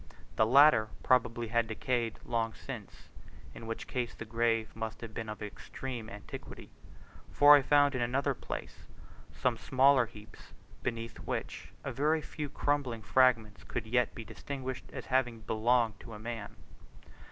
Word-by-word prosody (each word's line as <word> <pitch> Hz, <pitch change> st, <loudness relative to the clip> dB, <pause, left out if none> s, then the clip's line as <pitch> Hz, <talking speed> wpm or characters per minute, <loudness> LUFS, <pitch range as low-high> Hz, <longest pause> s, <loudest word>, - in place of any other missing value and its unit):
The 110 Hz, -, +3 dB
latter 135 Hz, -3 st, +7 dB, 0.2 s
probably 120 Hz, -2 st, +2 dB
had 115 Hz, 0 st, +2 dB
decayed 115 Hz, 0 st, -1 dB
long 115 Hz, -1 st, -1 dB
since 120 Hz, -7 st, -9 dB, 0.4 s
(in 115 Hz, -, -9 dB
which 115 Hz, -, -4 dB
case 125 Hz, -2 st, -3 dB
the 115 Hz, -, -7 dB
grave 115 Hz, -1 st, 0 dB
must 110 Hz, 0 st, -5 dB
have 115 Hz, -2 st, -7 dB
been 110 Hz, 0 st, -5 dB
of 105 Hz, 0 st, -6 dB
extreme 115 Hz, +2 st, -6 dB
antiquity), 105 Hz, 0 st, -9 dB, 0.6 s
for 145 Hz, 0 st, +8 dB
I 145 Hz, -, +5 dB
found 145 Hz, +1 st, +4 dB
in 130 Hz, -, -1 dB
another 130 Hz, +3 st, +1 dB
place -, -, -7 dB, 0.4 s
some 125 Hz, -2 st, 0 dB
smaller 130 Hz, 0 st, +4 dB
heaps 105 Hz, 0 st, -14 dB, 0.3 s
beneath 115 Hz, -1 st, -4 dB
which -, -, -5 dB
a -, -, -3 dB
very 155 Hz, +3 st, +1 dB
few 150 Hz, -3 st, -5 dB
crumbling 135 Hz, -5 st, -1 dB
fragments 115 Hz, -3 st, +3 dB
could 120 Hz, -, -4 dB
yet 125 Hz, +1 st, +1 dB
be 115 Hz, -, -7 dB
distinguished 130 Hz, 0 st, -6 dB
as -, -, -7 dB
having 125 Hz, -3 st, 0 dB
belonged 115 Hz, -1 st, +1 dB
to 115 Hz, -, -10 dB
a -, -, -9 dB
man. 115 Hz, -2 st, -6 dB
120 Hz, 150 wpm, -31 LUFS, 110-130 Hz, 0.6 s, for